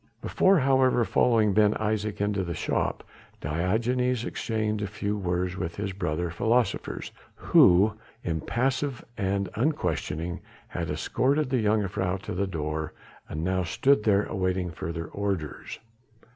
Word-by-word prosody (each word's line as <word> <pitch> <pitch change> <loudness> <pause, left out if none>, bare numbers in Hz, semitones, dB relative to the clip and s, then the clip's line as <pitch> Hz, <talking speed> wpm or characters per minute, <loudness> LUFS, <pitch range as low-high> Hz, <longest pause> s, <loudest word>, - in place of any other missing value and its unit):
Before, 195 0 +3
however, 130 -4 +3
following 110 -4 +3
Ben 105 +1 +4
Isaje 110 -1 -1
into 100 -1 0
the 85 -2 -4
shop - - -1 0.4
Diogenes 115 - 0
exchanged 110 -2 -2
a - - -1
few 105 +1 -3
words 90 -2 -1
with 85 -3 -3
his 100 -2 -3
brother 85 -2 -2
philosophers, 115 +4 0 0.2
who, 95 +5 +5 0.3
impassive 125 - -1
and 100 -2 -1
unquestioning, 90 - -1 0.3
had - - -4
escorted 140 +1 0
the 125 -4 +2
jongejuffrouw 95 -3 0
to - - -4
the 100 +2 -1
door, 80 -3 -3 0.4
and 80 +1 -4
now 95 +1 +1
stood 105 - +2
there 105 -1 +3
awaiting 95 -2 -1
further 85 +1 -5
orders. 95 -4 -4
100 Hz, 130 wpm, -27 LUFS, 90-115 Hz, 0.4 s, who